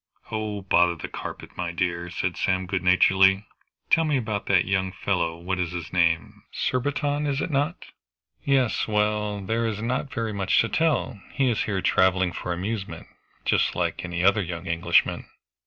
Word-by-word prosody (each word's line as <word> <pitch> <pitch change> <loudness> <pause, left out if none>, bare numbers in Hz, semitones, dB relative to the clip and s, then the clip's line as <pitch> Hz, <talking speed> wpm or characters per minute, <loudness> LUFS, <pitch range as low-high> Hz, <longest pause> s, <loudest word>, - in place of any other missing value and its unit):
"Oh, 105 -2 -3
bother 90 -2 +3
the - - -6
carpet, - - -8
my 90 -1 -3
dear," 85 0 -2
said 90 0 -2
Sam 95 0 0
good 95 0 -2
naturedly; 95 +2 +4 0.5
"tell 165 - +5
me 150 -3 +1
about 110 -4 -3
that 95 -3 +4
young 95 -1 0
fellow 90 -3 -1
what 90 +2 -3
is 90 -1 -2
his 85 -1 -6
name? 85 -2 +1
Surbiton, 145 +3 -1
is 140 -1 0
not 150 +2 0
it?" - - -12 0.6
"Yes 135 -4 +1
well, 105 -1 0
there 115 +4 -1
is 105 -2 -3
not 125 +5 -2
very 115 -2 -2
much 95 -1 +2
to 115 - -1
tell. 150 -9 0
He 135 -3 +2
is 110 - 0
here 95 -3 -2
traveling 95 -1 +3
for 90 - -5
amusement, 95 +3 -4 0.4
just - - +2
like - - -1
any 85 -1 -3
other 100 +2 +4
young 85 -1 -5
Englishman. 85 -2 +1
95 Hz, 170 wpm, -25 LUFS, 90-115 Hz, 0.6 s, tell